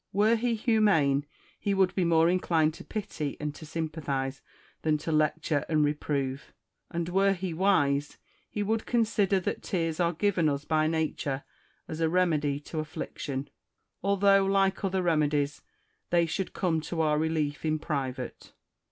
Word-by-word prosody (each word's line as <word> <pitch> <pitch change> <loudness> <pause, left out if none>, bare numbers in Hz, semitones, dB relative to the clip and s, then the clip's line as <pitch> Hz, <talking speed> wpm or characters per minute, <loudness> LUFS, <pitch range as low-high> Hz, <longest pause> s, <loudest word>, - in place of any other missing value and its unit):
Were 215 +3 +4
he 235 0 0
humane, 195 - +3 0.3
he 200 -1 0
would 190 -1 +3
be 185 - +1
more 165 -1 +4
inclined 165 -3 +2
to - - -10
pity 200 -9 -4
and 150 -1 -3
to 155 +1 -11
sympathise 145 -5 -3 0.4
than 155 -1 +2
to 160 - -4
lecture 155 -1 +1
and 155 -2 +3
reprove; 140 -2 -2 0.3
and 170 -1 -3
were 195 +2 +3
he 185 -2 -4
wise, 150 -6 +2 0.3
he 210 - -2
would 220 +2 -1
consider 210 -5 +2
that - - -3
tears 165 -3 -2
are 170 -1 +3
given 175 -2 +2
us 140 0 -2
by 155 -1 +2
Nature 155 -4 -1 0.4
as 160 - -6
a 160 - +3
remedy 155 -5 +1
to 155 +2 -5
affliction, 145 -2 -5 0.5
although, 200 0 +4
like 195 0 +2
other 190 -1 0
remedies, 150 -3 +1 0.5
they 170 -1 +3
should 180 +4 -3
come 165 -4 0
to 165 +1 -3
our 150 -1 +2
relief 155 -2 -1
in 155 -1 +1
private. 140 -5 -4
160 Hz, 155 wpm, -28 LUFS, 150-190 Hz, 0.5 s, Were